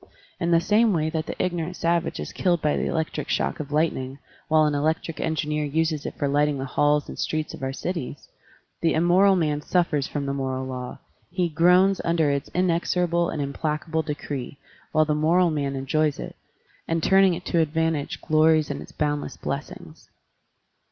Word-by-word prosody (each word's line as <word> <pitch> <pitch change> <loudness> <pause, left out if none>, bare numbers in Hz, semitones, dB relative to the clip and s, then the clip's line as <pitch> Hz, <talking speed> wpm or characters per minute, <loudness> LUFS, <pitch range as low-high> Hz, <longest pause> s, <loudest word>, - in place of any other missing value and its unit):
In 170 - 0
the 170 -1 +5
same 215 +4 +3
way 160 -2 0
that 160 -1 -3
the - - -4
ignorant 175 -1 -2
savage 170 0 0
is - - -6
killed 175 -3 +1
by 150 -1 +1
the - - -1
electric 160 -1 -2
shock - - -1
of 150 -1 -6
lightning, 145 -4 0 0.3
while 155 -1 +4
an 150 - +1
electric 155 +2 -1
engineer 150 -1 -1
uses 155 0 -1
it - - -6
for 145 - 0
lighting 145 +1 +2
the 135 - -3
halls 145 +2 +1
and - - -9
streets 155 -1 -2
of - - -9
our 135 0 -2
cities, 150 -1 -5 0.5
the 165 -1 +2
immoral 180 +4 +4
man 150 -4 0
suffers 150 -4 +1
from 145 -1 -3
the 140 - -2
moral 130 -1 -2
law, 125 -1 -6 0.3
he 175 0 0
groans 180 +4 +4
under 165 -3 +2
its 140 -1 -2
inexorable 175 -1 +1
and 150 -3 -2
implacable 155 +3 -2
decree, 145 -3 -5 0.3
while 155 0 +3
the 150 - 0
moral 165 +3 +3
man 140 -2 -2
enjoys 150 +2 0
it, - - -7 0.5
and 165 -1 -1
turning 190 -2 +5
it 180 +2 -9
to 170 - +1
advantage 160 -1 0
glories 155 -1 +3
in - - -5
its - - -11
boundless 145 -1 -2
blessings. - - -7
155 Hz, 180 wpm, -24 LUFS, 145-170 Hz, 0.5 s, the